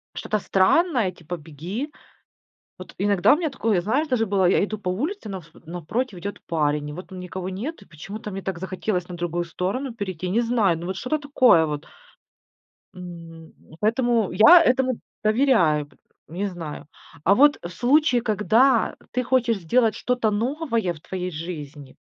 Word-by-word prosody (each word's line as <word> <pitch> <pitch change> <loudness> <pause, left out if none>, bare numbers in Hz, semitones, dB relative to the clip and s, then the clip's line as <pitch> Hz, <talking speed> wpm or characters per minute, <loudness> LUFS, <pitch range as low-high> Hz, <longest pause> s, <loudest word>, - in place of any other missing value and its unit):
что-то 215 - -2
странное, 220 - +2
типа 175 0 -7
"беги". 170 - -6 0.9
Вот 185 - -11
иногда 200 +1 +4
у - - +2
меня 325 -2 -1
такое, 220 -8 0
знаешь, 265 - 0
даже 250 -5 +1
было: 195 -2 +1
я 180 - +4
иду 215 +1 -3
по 190 -3 -4
улице, 285 - -3
навс 185 -5 -7
напротив 180 - -4
идет 200 +3 -6
парень, 150 -2 0
и - - -6
вот 180 +4 -8
там 185 - -8
никого 180 0 -5
нет. 220 - -5
И - - -15
почему-то 195 +7 -8
мне 195 0 -5
так 190 -2 -4
захотелось 185 0 -3
на 180 - -7
другую 175 0 -2
сторону 205 +10 -3
перейти, 185 -5 -4
не 220 +6 +2
знаю, 225 -7 +2
ну 170 - -6
вот 190 0 -4
что-то 310 +8 -1
такое 250 - +5
вот. 150 -1 -4 1.1
М. 165 -3 -10 0.3
Поэтому 230 -1 +1
я 325 - +8
этому 255 -3 +2 0.3
доверяю, 215 - +3
пот 145 - -26 0.3
не 185 +5 -2
знаю. 170 -8 -7 0.4
А 195 - +5
вот 290 +5 +5
в 170 - -5
случае, 250 - +3
когда 225 +3 +2 0.2
ты 250 - 0
хочешь 240 -3 +1
сделать 220 +6 +2
что-то 245 -3 0
новое 230 - -1
в 155 - -14
твоей 180 +2 -4
жизни. 150 -4 -7
195 Hz, 170 wpm, -24 LUFS, 175-245 Hz, 1.1 s, я